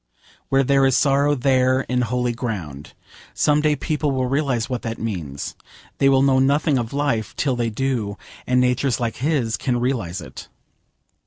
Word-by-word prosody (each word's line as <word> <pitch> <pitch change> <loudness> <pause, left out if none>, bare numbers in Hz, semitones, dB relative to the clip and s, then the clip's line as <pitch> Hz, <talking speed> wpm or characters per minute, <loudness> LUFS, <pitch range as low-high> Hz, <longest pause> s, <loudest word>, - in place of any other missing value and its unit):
Where 135 0 +3
there 135 +1 +3
is 130 -1 +3
sorrow 140 +3 +3
there 130 0 +2
is 125 0 0
holy 125 +1 -1
ground. 90 - -6 0.4
Some 150 0 +3
day 150 -1 +2
people 150 0 -1
will 130 -2 0
realise 130 -3 0
what 125 -3 -3
that 115 0 -4
means. 85 -11 -5 0.4
They 135 - +5
will 135 0 +4
know 135 -1 +4
nothing 140 +1 +2
of 115 -1 -4
life 140 -7 -1
till 135 -4 0
they 120 -1 -1
do, 110 -4 -2 0.3
and 125 0 +3
natures 125 0 +1
like 115 -2 -2
his 130 -3 0
can 125 -2 -1
realise 115 -8 -2
it. - - -10
125 Hz, 170 wpm, -21 LUFS, 115-140 Hz, 0.4 s, They